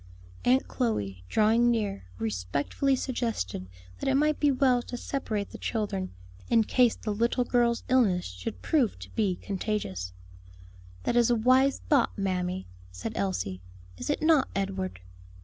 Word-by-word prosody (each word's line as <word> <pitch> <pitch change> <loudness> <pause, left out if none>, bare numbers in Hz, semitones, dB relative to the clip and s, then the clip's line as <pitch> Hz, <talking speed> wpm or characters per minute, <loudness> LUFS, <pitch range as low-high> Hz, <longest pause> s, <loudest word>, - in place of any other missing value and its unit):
Aunt 255 +2 +4
Chloe, 100 - -2
drawing 225 +3 +4
near, 210 - -1
respectfully 110 - 0
suggested 230 - -2 0.3
that - - -1
it 270 - +3
might 300 +2 +2
be 295 - +4
well 255 -2 +3
to 245 - -6
separate 220 -7 -3
the - - -9
children, 205 -4 -2 0.4
in 230 -1 +5
case 245 +1 +3
the 210 - -3
little 235 +4 +1
girl's 240 -1 +2
illness 225 -9 +3
should 90 0 -6
prove 275 -9 +2
to 90 +1 -11
be 200 -5 +1
contagious. 180 - -3 0.9
"That - - 0
is 240 0 +4
a 240 - +4
wise 255 +4 +4
thought, 280 -8 +3
mammy," 185 -1 -1 0.3
said 90 0 -5
Elsie. 95 -1 -2 0.4
"Is - - -4
it 295 - 0
not, 315 -4 +5
Edward?" 190 - -2
220 Hz, 150 wpm, -28 LUFS, 180-250 Hz, 0.9 s, in